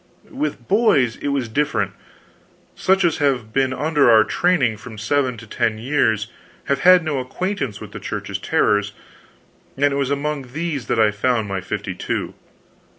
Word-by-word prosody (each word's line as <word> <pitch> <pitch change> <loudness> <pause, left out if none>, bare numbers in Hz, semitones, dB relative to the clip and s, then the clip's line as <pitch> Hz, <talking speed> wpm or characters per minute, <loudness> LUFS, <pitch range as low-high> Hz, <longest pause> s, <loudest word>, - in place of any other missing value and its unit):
With 295 +1 -4
boys 190 - +3
it - - -5
was 140 -4 -1
different. 145 +6 0 0.8
Such 190 0 +2
as 170 - +1
have 130 -7 0
been 135 -1 +2
under 145 -1 +2
our 110 -2 +7
training 140 -8 +1
from 110 0 -11
seven 130 +2 0
to 115 - -10
ten 110 0 -1
years 110 -3 +1 0.4
have 140 -1 0
had 180 +3 +6
no 150 -4 -1
acquaintance 135 - -3
with - - -10
the - - -7
Church's - - -5
terrors, 105 0 +1 0.8
and 140 +1 +2
it - - -1
was 140 -2 0
among 140 -3 -3
these 155 -5 -3
that - - 0
I 110 -1 +4
found 110 +1 0
my 95 -1 -3
fifty 95 - -4
two. - - -3
135 Hz, 165 wpm, -21 LUFS, 110-150 Hz, 0.8 s, our